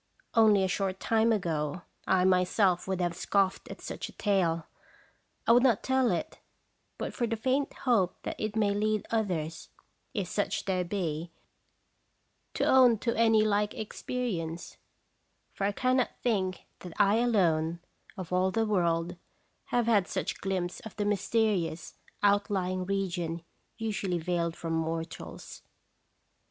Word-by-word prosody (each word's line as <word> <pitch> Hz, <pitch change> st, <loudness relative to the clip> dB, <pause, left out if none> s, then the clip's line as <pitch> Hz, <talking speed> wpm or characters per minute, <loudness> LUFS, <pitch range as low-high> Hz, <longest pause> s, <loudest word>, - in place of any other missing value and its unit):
Only 215 Hz, -4 st, +5 dB
a -, -, +2 dB
short 190 Hz, 0 st, -1 dB
time 225 Hz, 0 st, +2 dB
ago 170 Hz, -5 st, -1 dB, 0.2 s
I 185 Hz, -1 st, +3 dB
myself 180 Hz, 0 st, +3 dB
would 190 Hz, -1 st, -1 dB
have 175 Hz, -1 st, 0 dB
scoffed 195 Hz, +1 st, 0 dB
at -, -, -9 dB
such -, -, -5 dB
a -, -, -14 dB
tale. 175 Hz, -5 st, +1 dB, 0.8 s
I -, -, +4 dB
would 240 Hz, +1 st, +7 dB
not 245 Hz, -5 st, +3 dB
tell 260 Hz, -2 st, +2 dB
it, -, -, -3 dB, 0.6 s
but -, -, -4 dB
for 240 Hz, -, -1 dB
the 230 Hz, -, -1 dB
faint 260 Hz, +5 st, 0 dB
hope 215 Hz, -9 st, +1 dB
that -, -, -4 dB
it 215 Hz, 0 st, -3 dB
may 210 Hz, -2 st, +2 dB
lead 215 Hz, +1 st, 0 dB
others 175 Hz, -8 st, -2 dB, 0.5 s
if 200 Hz, -5 st, -1 dB
such 205 Hz, +3 st, -1 dB
there 185 Hz, -2 st, 0 dB
be 170 Hz, -3 st, -3 dB, 1.3 s
to -, -, +1 dB
own 250 Hz, -3 st, +6 dB
to 230 Hz, +2 st, -1 dB
any 225 Hz, -1 st, +4 dB
like 210 Hz, -1 st, +1 dB
experience; 210 Hz, -7 st, -4 dB, 0.8 s
for 195 Hz, -, -2 dB
I 200 Hz, -, +2 dB
cannot 255 Hz, +3 st, +1 dB
think 190 Hz, -6 st, 0 dB, 0.2 s
that 180 Hz, -2 st, -9 dB
I 205 Hz, 0 st, +4 dB
alone, 170 Hz, -8 st, +2 dB, 0.4 s
of 185 Hz, -2 st, -6 dB
all 185 Hz, +1 st, +3 dB
the 225 Hz, +3 st, +1 dB
world, 175 Hz, -4 st, 0 dB, 0.5 s
have 240 Hz, -1 st, +1 dB
had 210 Hz, -5 st, +3 dB
such -, -, -3 dB
glimpse 185 Hz, -2 st, -2 dB
of 220 Hz, -, -10 dB
the 210 Hz, -, -1 dB
mysterious 205 Hz, -5 st, 0 dB, 0.3 s
outlying 195 Hz, -3 st, +1 dB
region 175 Hz, -4 st, -2 dB, 0.3 s
usually 205 Hz, -5 st, -2 dB
veiled 170 Hz, 0 st, -1 dB
from 165 Hz, -1 st, -4 dB
mortals. 165 Hz, 0 st, -4 dB
195 Hz, 145 wpm, -29 LUFS, 175-220 Hz, 1.3 s, would